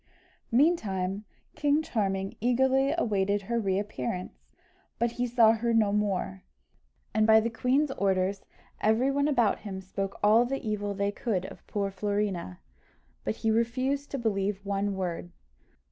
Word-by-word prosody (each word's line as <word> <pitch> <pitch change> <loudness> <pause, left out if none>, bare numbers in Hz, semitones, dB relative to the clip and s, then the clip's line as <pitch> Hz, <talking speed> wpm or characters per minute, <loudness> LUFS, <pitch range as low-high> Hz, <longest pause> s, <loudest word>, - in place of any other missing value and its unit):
Meantime 210 - +1 0.3
King 295 +1 +2
Charming 195 -8 -2
eagerly 265 +3 +3
awaited 200 - +1
her 235 +4 -1
re 195 -3 0
appearance, 180 -4 -4 0.5
but 235 0 +1
he 245 +1 -2
saw 230 -2 +5
her 230 +1 0
no 210 -3 +3
more; 195 - -1 0.7
and 215 +1 +3
by 220 0 +7
the 230 +1 -1
queen's 265 +5 +1
orders, 195 -3 0 0.4
every 225 +5 +2
one 285 +1 +1
about 245 -8 +2
him 195 -3 -6
spoke 195 +1 -5
all 215 +3 +6
the 260 -1 -3
evil 205 -1 -2
they 200 +1 0
could 205 -3 -2
of - - -11
poor 200 -2 -2
Florina, 195 - -2 0.6
but 110 - -2
he 220 - +4
refused 255 +5 0
to 275 - -3
believe 200 -4 -1
one 200 0 -1
word. 175 -2 -3
210 Hz, 145 wpm, -28 LUFS, 195-240 Hz, 0.7 s, by